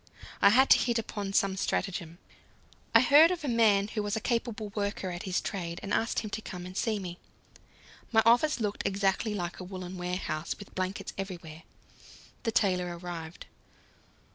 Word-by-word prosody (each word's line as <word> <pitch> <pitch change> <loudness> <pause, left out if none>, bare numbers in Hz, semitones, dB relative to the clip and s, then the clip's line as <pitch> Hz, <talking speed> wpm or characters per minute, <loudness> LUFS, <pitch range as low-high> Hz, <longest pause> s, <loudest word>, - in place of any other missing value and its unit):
I 200 - +8
had 260 +6 +5
to - - +8
hit 240 -1 +1
upon 205 -3 -4
some 195 -1 +2
stratagem. 175 -3 -2 0.8
I 230 - +9
heard 290 +5 +7
of 355 -3 -3
a - - -2
man 215 -4 +3
who 215 - -2
was 205 +1 -2
a - - 0
capable 230 -2 -2
worker 200 -2 -3
at 175 0 -5
his 180 - +1
trade, 170 -4 -4
and 200 - -3
asked 225 - +1
him 215 -2 -7
to 220 - -3
come 180 -4 -7
and 185 +1 -9
see 220 +1 0
me. 180 -3 -6 0.9
My 220 -1 +5
office 245 +6 +4
looked 210 -2 -2
exactly 195 +2 0
like 175 -3 -4
a - - -6
woollen 185 0 -7
warehouse, 180 -3 -3
with 200 - -12
blankets 185 +1 -3
everywhere. 170 -5 -6 0.8
The 225 - -1
tailor 180 -5 +1
arrived. 170 -1 -7
200 Hz, 175 wpm, -29 LUFS, 180-225 Hz, 0.9 s, I